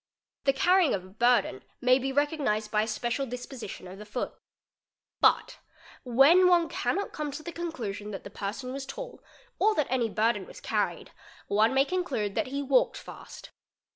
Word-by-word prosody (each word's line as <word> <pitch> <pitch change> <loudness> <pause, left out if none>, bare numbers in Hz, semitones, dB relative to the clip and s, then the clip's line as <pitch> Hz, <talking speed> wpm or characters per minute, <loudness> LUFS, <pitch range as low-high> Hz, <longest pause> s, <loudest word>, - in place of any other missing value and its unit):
The 275 - +4
carrying 355 - +4
of 185 -1 -6
a - - -14
burden 235 - +2 0.2
"mhay 255 +1 +4
be 270 +1 -1
recognised 275 -7 0
by 210 - +3
a 215 - -1
special 240 +5 -2
disposition 245 -5 -7
of 190 +2 -10
the 210 - -9
foot. 245 +4 -3 0.9
But, - - +3 0.4
when 275 +9 +6
one 345 -2 +4
'cannot 400 +1 -2
come 300 -1 -3
to 310 - -7
the 345 - -6
conclusion 230 -13 -5
that 195 - -6
the 200 - -9
person 220 +6 -5
was 270 0 -6
tall - - -8 0.4
or 430 0 +3
that 300 - +2
any 245 -3 +1
burden 215 -2 0
was - - -11
carried, - - -2 0.4
one 220 +5 +3
may 270 +1 +5
conclude 275 - -2
that 305 - -1
he 280 +2 -3
walked 265 -2 +2
fast. - - -11
255 Hz, 175 wpm, -28 LUFS, 215-295 Hz, 0.9 s, when